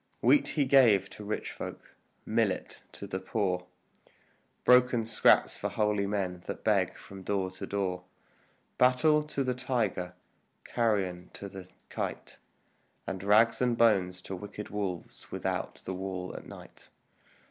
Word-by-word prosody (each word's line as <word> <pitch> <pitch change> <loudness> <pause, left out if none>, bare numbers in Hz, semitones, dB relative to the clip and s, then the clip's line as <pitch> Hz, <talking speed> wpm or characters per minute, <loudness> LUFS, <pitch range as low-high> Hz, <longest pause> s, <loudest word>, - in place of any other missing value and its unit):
Wheat 295 - +5
he 145 -3 +1
gave 115 -8 +5
to 105 - -9
rich 105 +1 -3
folk, - - -8 0.3
millet - - -1
to - - -7
the 95 -1 -4
poor, 95 -4 -1 1.0
Broken 125 -2 +5
scraps 110 -1 +4
for - - -3
holy 105 -2 +1
men 95 -3 -2
that - - -5
beg - - +2
from 95 -1 -11
door 95 -1 -1
to 95 - -7
door; 90 -3 -2 0.7
Battle 130 +5 +5
to 150 -2 -2
the 130 -1 0
tiger, 115 -8 -2 0.5
carrion 95 -6 -1
to 100 - -7
the 95 -1 -10 0.2
kite, - - -5 0.7
And 95 -1 -4
rags 105 +5 +4
and 120 -2 +2
bones 95 -6 +3
to 95 - -6
wicked 105 +2 -8
wolves 95 -4 -5
without - - -3
the 95 - -3
wall 95 -1 -4
at - - -9
night. - - -13
100 Hz, 140 wpm, -30 LUFS, 95-115 Hz, 1.0 s, Wheat